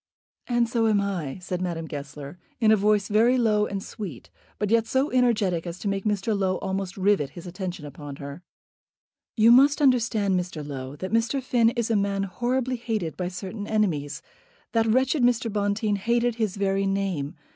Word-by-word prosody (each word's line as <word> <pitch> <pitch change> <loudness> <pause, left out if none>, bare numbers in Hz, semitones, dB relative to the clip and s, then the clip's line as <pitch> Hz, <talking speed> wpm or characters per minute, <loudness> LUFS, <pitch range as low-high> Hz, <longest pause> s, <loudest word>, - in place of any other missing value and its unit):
"And 240 -1 +2
so 230 -1 +1
am 210 -2 +3
I," 185 -9 -3
said 180 0 -4
Madame 170 -3 -3
Goesler, 145 +1 -8 0.2
in 220 -2 +4
a - - +7
voice 210 -1 +2
very 230 +5 +4
low 215 -3 +2
and 195 -1 -4
sweet, 185 - -8 0.3
but 210 0 -1
yet 230 -1 +3
so 265 +5 +1
energetic 210 -9 +2
as 170 +1 -5
to 205 - -5
make 195 0 -1
Mr. 210 +1 0
Low 190 -2 0
almost 190 -1 -4
rivet 190 -7 +2
his 175 - -11
attention 180 -3 -5
upon 145 0 -8
her. 140 +3 -8 1.0
"You 225 +1 +6
must 275 +5 +6
understand, 225 -8 +2
Mr. 175 -4 -5
Low, 135 -1 -6
that 185 +7 -6
Mr. 230 +4 +2
Finn 245 -3 +3
is 235 -1 -1
a - - +3
man 200 -1 0
horribly 250 +5 -1
hated 220 -8 -3
by 180 - -3
certain 190 +3 -6
enemies. 155 -9 -1 0.5
That 225 -1 +2
wretched 260 +5 +2
Mr. 240 -3 +2
Bonteen 205 0 0
hated 235 +3 +1
his 215 -4 -1
very 195 0 +1
name. 195 -7 -2
200 Hz, 180 wpm, -25 LUFS, 180-230 Hz, 1.0 s, a